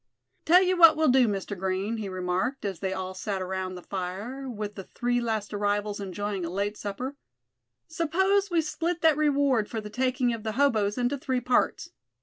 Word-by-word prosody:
"Tell 360 +3 +6
you 370 0 +2
what 330 -3 +8
we'll 315 -2 +3
do, 250 -1 +5
Mr. 200 0 -3
Green," 190 +4 -2
he 210 -3 -4
remarked, 185 +8 -2
as 195 -4 -3
they 190 0 -2
all 190 0 -4
sat 195 +1 -3
around 185 0 -3
the 180 - -9
fire, 200 +9 -5
with 210 -3 -5
the 195 - -8
three 245 0 -1
last 220 -3 -2
arrivals 205 0 -1
enjoying 200 0 -3
a 170 - -3
late 200 +3 -2
supper; 250 +8 -5 0.7
"suppose 380 +5 +1
we 340 -2 +2
split 330 +2 -2
that 320 -2 +5
reward 280 -7 +2
for 225 - -3
the 210 -1 -8
taking 250 0 +1
of 230 - -5
the 220 0 -3
hoboes 220 -6 +2
into 250 +3 0
three 260 -1 -1
parts. 250 0 0
220 Hz, 190 wpm, -27 LUFS, 195-275 Hz, 0.7 s, what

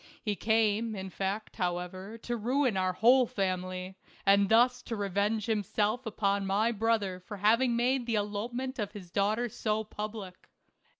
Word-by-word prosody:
He 210 -2 -2
came, 220 +1 +1
in 190 -1 -6
fact, 200 +3 -3
however, 185 +3 -3
to 240 - -2
ruin 250 +1 +1
our 185 -1 +1
whole 245 +5 +5
family, 185 -1 -3 0.3
and 200 0 +5
thus 245 +2 +4
to 230 - -5
revenge 205 +1 0
himself 215 +2 0
upon 200 -2 0
my 210 +4 +2
brother 215 -4 0
for 205 +3 -9
having 230 +5 +3
made 245 +1 +1
the 230 - +1
elopement 235 +6 -3
of 205 -1 -3
his 185 -5 -10
daughter 215 +5 +1
so 215 -1 -1
public. 210 -3 -7
210 Hz, 155 wpm, -30 LUFS, 195-230 Hz, 0.3 s, whole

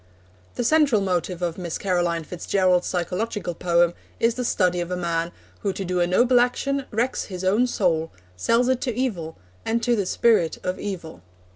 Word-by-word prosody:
The 245 - -1
central 285 -3 +4
motive 180 -2 -1
of 170 0 -2
Miss 170 -3 -3
Caroline 175 -3 0
Fitz 175 +2 -8
Gerald's 185 -2 +3
psychological 180 +1 -2
poem 170 0 +2 0.3
is 230 0 +3
the 250 - -3
study 180 -6 +1
of 175 - -4
a 180 - -2
man 170 -1 -1 0.3
who 200 - -1
to 195 - -4
do 180 0 -1
a 175 - +3
noble 245 +7 +4
action 275 +3 0
wrecks 240 +4 -1
his 185 -2 -7
own 210 +7 +3
soul, 165 -8 0 0.2
sells 230 - +2
it 260 -1 +1
to 245 -4 -2
evil, 190 -11 -2 0.3
and 230 +1 -1
to 240 0 +3
the 200 -4 -1
spirit 200 -6 +2
of 185 0 -2
evil. 170 - -6
185 Hz, 185 wpm, -24 LUFS, 175-235 Hz, 0.3 s, central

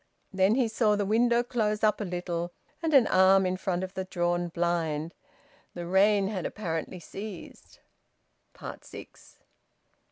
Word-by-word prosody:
Then 190 +3 +3
he 250 -2 +2
saw 220 -1 +2
the 205 -1 -1
window 235 +3 +3
close 220 -3 -1
up 215 0 +2
a - - -2
little, 175 -1 -3 0.3
and 325 -1 -1
an 260 -4 +7
arm 190 0 +5
in 185 0 0
front 185 -1 -2
of 185 0 -6
the 190 - -3
drawn 175 -1 -1
blind. 170 -2 -1 0.6
The 175 - -5
rain 195 +2 +3
had 195 -4 -3
apparently 175 -2 -4
ceased. 195 +2 -10 1.0
SIX. - - -13
190 Hz, 140 wpm, -28 LUFS, 175-215 Hz, 1.0 s, an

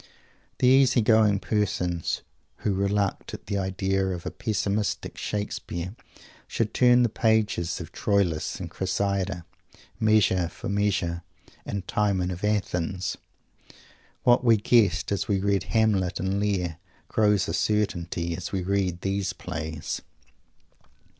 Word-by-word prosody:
The 130 - +3
easy 130 -2 +5
going 110 -2 +4
persons 90 -6 -1 0.4
who 105 - +2
reluct 100 +1 -1
at - - -13
the 100 -1 -1
idea 95 0 0
of 90 -2 -4
a - - -3
pessimistic 105 -1 -2
Shakespeare 95 -2 -4 0.5
should 115 -2 -1
turn 125 0 +5
the - - +4
pages 110 -6 +1
of - - -8
Troilus 90 -6 0
and - - -5
Cressida, 95 -3 -2 0.5
Measure 105 -5 +3
for - - -7
Measure, 100 -4 0 0.5
and 100 -3 -4
Timon 95 -4 +1
of 90 +2 -7
Athens. 95 -3 -1 1.1
What 120 +1 +5
we 115 -2 +5
guessed 110 -1 +3
as 100 - -1
we 100 -2 +1
read 100 -1 +1
Hamlet 105 -5 +1
and 95 +1 -1
Lear 90 -5 -1 0.3
grows 105 -3 +2
a 80 - -2
certainty 85 -5 -1
as 85 0 -6
we 95 -2 -1
read 95 -2 0
these 95 -1 -1
plays. 80 -3 -5
100 Hz, 125 wpm, -26 LUFS, 90-105 Hz, 1.1 s, easy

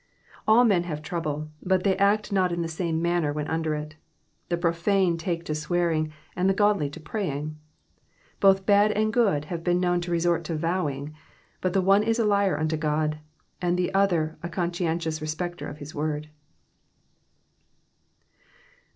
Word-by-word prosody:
All 220 +3 +6
men 185 -6 +3
have 155 -3 -5
trouble, 155 -3 -3
but 185 0 +1
they 195 -2 +3
act 205 +2 +2
not 185 -2 +2
in 170 0 -1
the - - -2
same 165 0 -2
manner 170 -3 +1
while 150 0 -3
under 160 -1 -1
it; 150 +1 -7 0.5
the 175 - +1
profane 175 +2 +2
take 165 0 -3
to - - -4
swear^^ 170 +2 0
ing 155 0 -1 0.2
and 180 +2 +2
the 195 - +2
godly 205 -7 +2
to 145 - -10
prayinjj. 155 -5 -3 0.9
Both 195 -1 +4
bad 205 +1 +5
and 215 +1 0
good 195 -12 +2
have 165 +1 -5
been 175 0 +2
known 175 -1 +1
to 175 - -5
resor^ 170 0 +1
to 165 - -2
vowing, 155 -3 -2 0.5
but 185 -1 0
the 190 - +2
one 195 +2 +5
is 225 +2 +1
a 230 - +2
liar 200 -6 +2
unto 155 0 0
God, 155 0 0 0.4
and 175 0 +1
the 180 +1 -1
other 175 -5 +1
a 170 - -5
conscientious 170 -2 -2
respecter 175 +3 -4
of 145 - -9
his 150 0 -9
word. 150 0 -3
170 Hz, 170 wpm, -26 LUFS, 155-190 Hz, 0.9 s, All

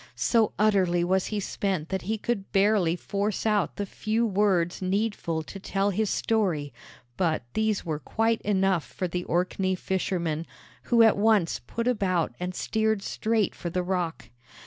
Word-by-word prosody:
So 230 -3 +2
utterly 190 -5 +3
was 185 +1 +1
he 210 - -2
spent 190 -4 -2
that 190 -1 -2
he 220 +4 -2
could 210 -2 -3
barely 195 -4 +3
force 200 +3 -2
out 210 -4 +1
the 205 - -3
few 220 +4 -1
words 190 -5 +1
needful 185 -4 -1
to 195 - -9
tell 195 +1 0
his 215 +2 0
story; 180 -13 0 0.4
but 165 -7 +1
these 220 -3 0
were 155 -3 -2
quite 225 +6 0
enough 195 -4 +1
for 185 - -4
the 180 +1 -3
Orkney 185 +2 0
fishermen, 175 -4 -2 0.4
who 235 -2 +5
at 225 - +5
once 205 -5 +3
put 230 - -4
about 185 -8 +1
and 180 0 -4
steered 220 -2 0
straight 220 -2 0
for 175 - -5
the 180 +2 -1
rock. 180 -3 -2
195 Hz, 160 wpm, -27 LUFS, 175-215 Hz, 0.4 s, who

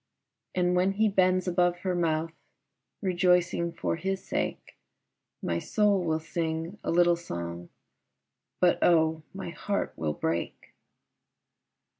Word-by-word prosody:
And 180 0 +2
when 185 +2 +2
he 220 +2 +3
bends 185 -1 +2
above 175 0 +1
her 185 -2 -1
mouth, 165 -2 0 0.7
Rejoicing 180 -2 +2
for 165 - -2
his 190 +3 -3
sake, - - -3 0.7
My 85 0 0
soul 205 - +2
will 160 -2 0
sing 165 +3 -3
a - - -3
little 175 0 +4
song, 85 - -6 0.9
But 175 -1 +4
oh, 160 -2 +3
my 190 -3 -6
heart 200 +3 -2
will 80 -1 -2
break. 80 +3 -3
175 Hz, 120 wpm, -28 LUFS, 160-185 Hz, 0.9 s, little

